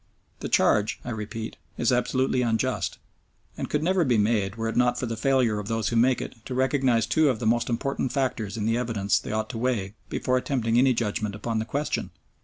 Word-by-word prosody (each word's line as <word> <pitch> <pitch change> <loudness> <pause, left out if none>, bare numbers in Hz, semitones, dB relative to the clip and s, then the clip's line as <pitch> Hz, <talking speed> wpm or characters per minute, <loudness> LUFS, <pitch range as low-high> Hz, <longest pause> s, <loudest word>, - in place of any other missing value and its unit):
The - - -4
charge, 105 0 +3
I 125 - -3
repeat, 110 0 -5 0.2
is 120 - +2
absolutely 125 +1 +1
unjust, 120 +2 0 0.6
and - - -4
could 150 +1 0
never 185 +1 +3
be 125 -6 +2
made 105 -2 +1
were 115 0 -2
it 115 - -3
not 125 0 +3
for - - -1
the 115 -1 -3
failure 120 -3 +2
of 105 - -6
those 115 -2 0
who - - -2
make 125 +2 +3
it 115 - -10
to 130 - -4
recognise 130 -3 +2
two 155 +5 +3
of 125 - 0
the 110 - -5
most 120 +2 +2
important 130 +2 -1
factors 120 -6 -1
in 105 - -2
the 115 +2 +1
evidence 110 -5 +1
they - - -7
ought 110 +3 -2
to 115 - -5
weigh 115 -6 -1 0.2
before 130 0 0
attempting 120 -3 +1
any 130 -1 +4
judgment 105 -2 -2
upon 110 +1 -2
the 110 - -2
question. 140 +6 -2
120 Hz, 215 wpm, -26 LUFS, 110-130 Hz, 0.6 s, any